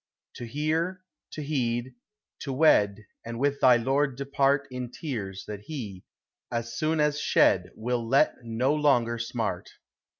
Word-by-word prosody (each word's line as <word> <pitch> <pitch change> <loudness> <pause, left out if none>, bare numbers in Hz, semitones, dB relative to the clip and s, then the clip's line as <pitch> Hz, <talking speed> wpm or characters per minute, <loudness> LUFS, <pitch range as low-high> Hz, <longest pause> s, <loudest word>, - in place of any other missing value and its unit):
To 120 - -6
hear, 160 +8 -1 0.3
to 155 - -5
heed, 125 -4 -1 0.5
to 140 - -5
wed, 105 -8 +3 0.2
And 115 0 -6
with 140 +2 0
thy 125 -2 +6
lord 135 +3 +1
depart 140 0 +1
In 125 -1 -5
tears 105 - -5
that 105 -1 -6
he, 105 -12 -7 0.5
as 115 0 -3
soon 155 +3 0
as 150 0 +2
shed, - - +3
Will 120 0 -2
let 135 +5 +3
no 120 +4 0
longer 125 -6 +2
smart. 110 -6 -3
130 Hz, 140 wpm, -27 LUFS, 115-145 Hz, 0.5 s, thy